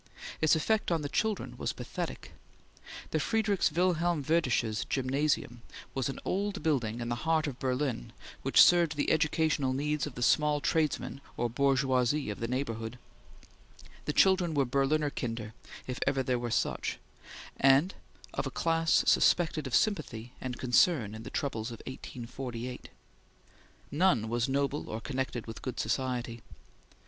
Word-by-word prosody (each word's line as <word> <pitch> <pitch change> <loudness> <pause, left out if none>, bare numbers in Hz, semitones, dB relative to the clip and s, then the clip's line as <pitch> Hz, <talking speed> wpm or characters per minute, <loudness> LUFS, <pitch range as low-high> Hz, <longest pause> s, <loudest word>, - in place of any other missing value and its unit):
Its 155 +1 +5
effect 215 +6 +1
on 165 -3 +1
the - - -1
children 215 +7 -1
was - - -2
pathetic. - - -6 0.8
The - - +1
Friedrichs 220 -4 +1
Wilhelm 175 -3 +1
Werdersches 125 -8 +1
Gymnasium 130 -2 0 0.3
was 135 0 -1
an 135 - -5
old 200 +1 -2
building 120 -8 0
in 120 - -3
the 120 - -1
heart 160 0 +2
of 135 -5 -5
Berlin 130 - -2 0.3
which - - +2
served 170 -3 +4
the 145 - +1
educational 155 -3 +2
needs 150 +2 -1
of 145 - -9
the 120 - -3
small 150 +3 +3
tradesmen 150 -2 -1 0.2
or 120 -1 -1
bourgeoisie 135 -1 +2
of 105 - -7
the 115 - -2
neighborhood; 115 -2 -3 1.1
the - - 0
children 180 -1 +3
were 140 -2 +3
Berliner 140 +3 +1
kinder 115 -4 -4 0.3
if 125 -1 -5
ever 135 -1 +2
there 125 -1 0
were 120 0 -3
such, 110 - -1 0.6
and 140 +7 +5 0.4
of - - -2
a - - -2
class 165 -1 +2
suspected 160 -4 +3
of 125 - 0
sympathy 125 - 0
and 125 -1 -4
concern 125 - +3
in 110 - -7
the - - -8
troubles 115 -5 -2
of 115 - -7
1848. 125 -1 -7 1.0
None 145 - +2
was 120 +2 0
noble 140 +2 -1
or 110 - -3
connected 130 -2 -3
with 115 -1 -8
good 130 - -5
society. 120 0 -2
135 Hz, 150 wpm, -30 LUFS, 120-155 Hz, 1.1 s, Its